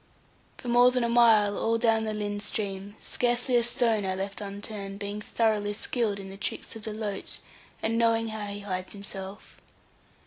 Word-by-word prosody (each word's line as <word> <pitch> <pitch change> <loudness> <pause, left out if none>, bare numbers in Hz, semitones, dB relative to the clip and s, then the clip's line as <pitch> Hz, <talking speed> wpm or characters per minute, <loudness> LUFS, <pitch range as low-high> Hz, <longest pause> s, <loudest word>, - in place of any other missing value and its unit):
For - - -9
more 245 +1 +6
than 250 -1 +1
a 235 - +1
mile 225 -4 +6
all 230 +2 +1
down 225 -1 +3
the 215 - -2
Lynn 205 -1 -2
stream, 200 -1 -3
scarcely 245 +1 +1
a 240 - +6
stone 230 -3 +2
I 190 -1 -1
left 195 +2 -4
unturned, 200 0 -5
being 205 +1 -4
thoroughly 210 -2 +1
skilled 215 -1 -1
in 195 0 -8
the 195 - -9
tricks 205 - -4
of 225 - -8
the 215 0 -4
loach, 210 -2 -3 0.5
and 225 +1 +1
knowing 230 -1 +3
how 215 -1 -4
he 200 0 -5
hides 185 -2 -4
himself. 200 0 -8
210 Hz, 180 wpm, -28 LUFS, 200-230 Hz, 0.5 s, more